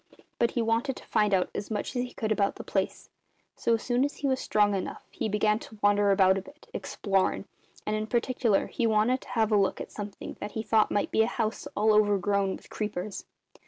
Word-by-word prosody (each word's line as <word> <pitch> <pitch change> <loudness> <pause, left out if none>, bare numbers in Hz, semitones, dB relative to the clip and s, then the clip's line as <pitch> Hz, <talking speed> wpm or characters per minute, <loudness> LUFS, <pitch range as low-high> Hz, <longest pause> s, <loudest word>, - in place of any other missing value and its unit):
But 235 - +3
he 235 - +3
wanted 230 +4 0
to - - -12
find 210 -2 +2
out 185 -2 +2
as 200 - -5
much 215 +4 -3
as 245 - +1
he 250 - -8
could 220 -1 -2
about 200 -2 +1
the - - -8
place; - - -2 0.4
so 235 - +2
as 225 - -5
soon 245 +1 +1
as 285 - -1
he 285 - -2
was 260 -1 +1
strong 205 -1 +2
enough 195 - -4
he - - -3
began 210 +1 +2
to 220 - -12
wander 205 0 +4
about 190 -1 +4
a - - -7
bit, 285 +9 -16
explorin', 195 -2 0 0.4
and 210 - 0
in 215 0 -2
particular 240 -3 +1
he 235 - -1
wanted 220 +4 +2
to - - -14
have 225 -3 +1
a 210 - +5
look 195 -1 +1
at - - -7
something 205 -1 -7
that 205 0 -6
he 220 - -3
thought 220 -1 +3
might 205 - 0
be 220 - +3
a 220 - +3
house 220 -2 -2
all 215 +1 +4
overgrown 200 -2 +2
with - - -15
creepers. 210 -2 -4
215 Hz, 230 wpm, -28 LUFS, 205-230 Hz, 0.4 s, a